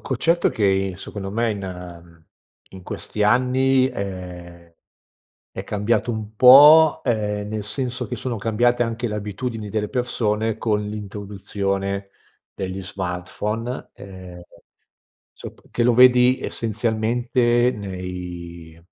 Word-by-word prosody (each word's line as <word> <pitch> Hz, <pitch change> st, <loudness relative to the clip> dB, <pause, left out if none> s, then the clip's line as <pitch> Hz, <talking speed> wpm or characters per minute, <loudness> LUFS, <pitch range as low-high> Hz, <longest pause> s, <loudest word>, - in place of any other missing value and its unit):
concetto 165 Hz, +6 st, +1 dB
che 105 Hz, -, -2 dB
i 95 Hz, -1 st, +1 dB
secondo 95 Hz, 0 st, -7 dB
me 115 Hz, +1 st, 0 dB
in 90 Hz, -4 st, -8 dB, 0.5 s
in 95 Hz, -1 st, -12 dB
questi 105 Hz, +3 st, -3 dB
anni 130 Hz, +3 st, +3 dB
è 90 Hz, -5 st, -8 dB, 0.8 s
è -, -, -6 dB
cambiato 105 Hz, +3 st, -1 dB
un 110 Hz, -1 st, -6 dB
po’, 145 Hz, +6 st, +8 dB
ehm, 105 Hz, -3 st, -1 dB
nel 105 Hz, -1 st, -4 dB
senso 125 Hz, +2 st, -4 dB
che 125 Hz, -, -4 dB
sono 120 Hz, +1 st, -4 dB
cambiate 120 Hz, +3 st, +1 dB
anche 115 Hz, +1 st, -3 dB
le 105 Hz, -, -4 dB
abitudini 105 Hz, +1 st, -5 dB
delle 105 Hz, 0 st, -2 dB
persone 110 Hz, -3 st, -1 dB
con 105 Hz, -2 st, 0 dB
l’introduzione 100 Hz, -1 st, -4 dB, 0.4 s
degli 95 Hz, 0 st, -5 dB
smartphone, 100 Hz, +6 st, -4 dB
ehm, 90 Hz, -2 st, -11 dB, 0.9 s
sop -, -, -11 dB
che 120 Hz, -, -1 dB
lo 120 Hz, 0 st, +3 dB
vedi 125 Hz, +1 st, +6 dB
essenzialmente 120 Hz, +2 st, 0 dB
nei 90 Hz, -4 st, -8 dB
105 Hz, 115 wpm, -22 LUFS, 95-120 Hz, 0.9 s, po